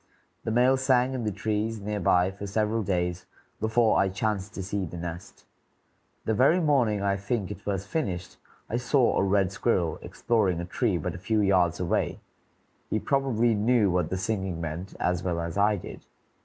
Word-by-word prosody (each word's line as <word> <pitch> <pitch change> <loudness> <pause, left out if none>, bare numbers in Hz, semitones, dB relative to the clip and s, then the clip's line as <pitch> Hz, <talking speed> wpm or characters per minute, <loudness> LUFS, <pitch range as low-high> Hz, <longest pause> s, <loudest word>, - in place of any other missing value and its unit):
The - - -1
male 125 +3 +4
sang 130 -1 +2
in 125 -3 -3
the 105 - 0
trees 110 +2 -2
near 105 +1 -3
by 90 0 +3
for 100 +1 -7
several 110 +3 0
days 90 -3 -2 0.3
before 110 +1 +3
I 95 - +3
chanced 100 0 -2
to 95 - -4
see 95 +1 -2
the 85 0 -6
nest. 85 0 -7 0.8
The 110 - +1
very 135 - +4
morning, 125 - +2
I 100 0 +2
think, 100 -1 -2
it 95 - -8
was 100 -1 -1
finished, 95 - -3 0.3
I 120 - -1
saw 125 0 +2
a - - +2
red 95 -1 +2
squirrel 90 -6 0
exploring 100 -7 0
a 85 - -3
tree 100 +1 0
but 80 - -3
a 90 - -8
few 110 +3 0
yards 90 -4 +2
away; 90 -2 -1 0.7
he - - +1
probably 120 -4 +1
knew 110 -1 +3
what 90 0 0
the 95 - -2
singing 95 -3 -2
meant 85 +4 -5
as 90 -1 0
well 85 -2 -1
as 85 +1 -4
I 105 +1 +3
did. 95 - -9
100 Hz, 185 wpm, -27 LUFS, 90-115 Hz, 0.8 s, male